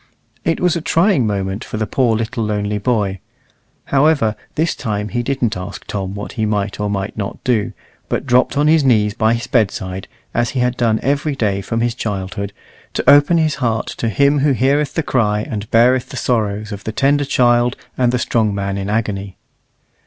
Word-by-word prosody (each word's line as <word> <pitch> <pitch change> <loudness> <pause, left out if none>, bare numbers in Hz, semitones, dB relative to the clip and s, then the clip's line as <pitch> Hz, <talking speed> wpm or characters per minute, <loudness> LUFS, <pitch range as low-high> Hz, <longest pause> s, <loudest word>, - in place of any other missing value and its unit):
It 165 - 0
was 180 -2 +2
a 170 - -2
trying 165 - +2
moment 100 +1 -2
for - - -6
the 110 - 0
poor 120 -1 +1
little 115 +2 -2
lonely 105 -1 -1
boy; 100 -4 0 0.7
however, 140 -6 +2 0.2
this 165 +2 +1
time 105 -5 -3
he 120 +5 -1
didn't 120 -3 -1
ask 95 +1 -7
Tom 95 -1 -4
what 105 - -6
he 110 - -3
might 105 -1 -2
or 105 0 -1
might 100 0 -3
not 100 -3 -4
do, 115 -5 0 0.4
but - - -1
dropped 125 +1 +2
on 145 - +3
his 155 -1 +4
knees 105 -5 +3
by 110 +3 +2
his 115 - -4
bedside, 95 -5 -1 0.3
as 120 -1 +1
he - - +2
had 125 0 +1
done 115 -3 +1
every 145 +1 0
day 100 -6 0
from 115 +4 -2
his 120 0 +1
childhood, 100 -3 -4 0.4
to - - -2
open 145 +4 +6
his 155 -2 +2
heart 115 -3 0
to 115 - -1
Him 140 +6 +3
who 140 0 +3
heareth 140 +3 +1
the 160 - 0
cry 105 -6 +1
and 105 -4 -5
beareth 125 +2 +3
the - - -7
sorrows 110 -3 -1
of 100 -1 -6
the 110 - -3
tender 145 +5 +2
child, 120 -2 +2 0.2
and 125 -2 +2
the 125 - +1
strong 110 -4 0
man 100 0 -2
in 100 +1 -4
agony. 100 -3 -2
115 Hz, 195 wpm, -18 LUFS, 105-130 Hz, 0.7 s, open